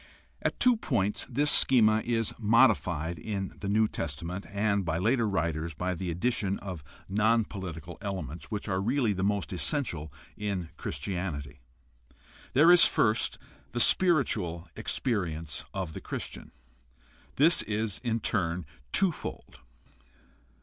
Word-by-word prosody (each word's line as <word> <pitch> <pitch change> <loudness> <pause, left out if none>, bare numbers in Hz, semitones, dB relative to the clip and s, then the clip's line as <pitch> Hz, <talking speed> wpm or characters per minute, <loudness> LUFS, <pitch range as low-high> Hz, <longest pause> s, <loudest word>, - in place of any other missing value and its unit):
— - - -35
At - - -2
two 250 -2 +4
points 105 - 0
this 145 +4 +2
schema 110 -4 +5
is 115 -2 0
modified 90 - +3
in 100 +2 -4
the 100 - -4
New 110 +2 +3
Testament 85 +5 -5
and 100 -1 0
by 80 -2 -1
later 115 +4 +2
writers 85 -3 -2
by 90 +3 -2
the 90 +1 -4
addition 100 +2 0
of 90 -6 -7 0.2
non 110 +3 +2
political 85 -5 -7
elements, 85 -6 -5
which 105 -1 -5
are 95 -1 0
really 120 0 +1
the 95 0 -3
most 100 -1 0
essential 85 - -2 0.2
in 100 -5 -3
Christianity. 75 -7 -4 0.9
There 155 +6 +7
is 180 - +8
first 110 0 +2 0.4
the 120 - -1
spiritual 115 - +2
experience 85 - -2
of 95 -5 -4
the - - -7
Christian. - - -6 0.8
This 165 +5 +5
is 105 -1 -2
in 115 -2 -1
turn 90 -5 -1 0.3
twofold. 185 -5 -2
100 Hz, 130 wpm, -29 LUFS, 85-115 Hz, 0.9 s, is